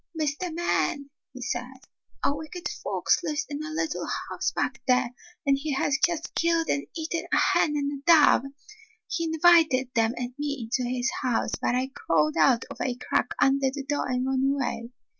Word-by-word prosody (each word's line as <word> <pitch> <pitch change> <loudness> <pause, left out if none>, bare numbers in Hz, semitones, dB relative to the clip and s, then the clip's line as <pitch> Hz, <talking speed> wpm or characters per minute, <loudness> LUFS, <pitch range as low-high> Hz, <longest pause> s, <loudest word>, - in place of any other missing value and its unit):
''Mr. 310 +4 -1
Man," 315 -3 -1 0.2
he 255 -1 -8
said, 250 +2 -4 0.4
"a 285 - +2
wicked 315 +4 -6
fox - - 0
lives 315 -1 -1
in 295 +1 -4
a 310 - -5
little 315 0 -2 0.2
house - - -1
back - - -2
here, 250 -1 +3 0.3
and 275 -1 +3
he 300 0 -2
has 275 +1 +1
just 335 -2 0
killed 335 -1 +1
and 140 0 0
eaten 325 +1 -3
a - - +3
hen 300 - +3
and 285 -1 -2
a 340 - +4
dove! 290 -4 +5 0.6
He 335 - -2
invited 320 -6 +4
them 230 0 +2
and 245 0 -4
me 285 -2 -2
into 250 -2 0
his 250 0 0
house, 245 -3 0
but - - +1
I 260 +1 -1
crawled 155 - +1
out 165 +9 +4
of - - -8
a 250 - -1
crack 245 0 -1
under 270 0 +3
the 280 0 -5
door 290 -2 -1
and 250 0 0
ran 265 0 +1
away. 270 -4 -1
275 Hz, 185 wpm, -26 LUFS, 250-310 Hz, 0.6 s, dove